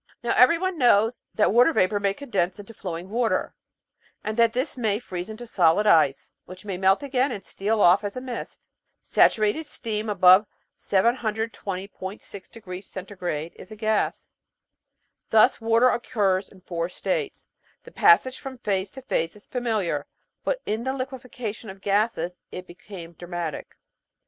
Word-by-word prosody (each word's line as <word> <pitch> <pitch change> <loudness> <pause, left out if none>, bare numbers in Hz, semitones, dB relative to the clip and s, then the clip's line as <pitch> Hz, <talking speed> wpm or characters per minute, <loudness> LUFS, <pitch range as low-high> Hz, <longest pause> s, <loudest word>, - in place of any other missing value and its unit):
Now 240 - +1
everyone 335 +6 +4
knows 235 -1 +3
that 210 - +3
water 245 +7 +6
vapour 205 -2 +2
may 200 -1 0
condense 190 -10 -1
into 205 +2 -10
flowing 180 -2 -6
water, 235 0 0 0.7
and 215 +1 -3
that 230 -1 +4
this 255 +5 -2
may 220 -5 0
freeze 185 -4 -6
into 220 +3 -8
solid 185 -2 +3
ice, 155 -8 +3
which 185 +2 -12
may 195 -3 -3
melt 190 +6 +2
again 270 0 0
and 195 - -6
steal 210 +3 -1
off 185 +1 +5
as 205 -1 -4
mist. 255 -2 -7 0.4
Saturated 215 +9 +2
steam 220 -5 -3
above 190 +1 +6 0.3
720.6 205 -3 -2 0.7
C. 180 -5 -5
is 185 - -12
a - - -7
gas. 215 0 -1 1.0
Thus 220 +1 +4
water 230 +2 +4
occurs 200 -6 0
in 190 - -18
four 170 -1 -3
states. 445 - -3 0.3
The - - -13
passage 260 -12 +4
from 265 -1 -8
phase 195 -4 -1
to 265 - -10
phase 165 -9 -1
is 210 - -14
familiar, 215 - -2 0.4
but - - -2
in 220 +2 -2
the 260 +1 -1
liquefaction 255 -5 -6
of 190 0 -10
gases 195 -3 0
it 180 - -7
became 175 -1 -11
dramatic. 175 -2 -6
210 Hz, 145 wpm, -25 LUFS, 185-240 Hz, 1.0 s, water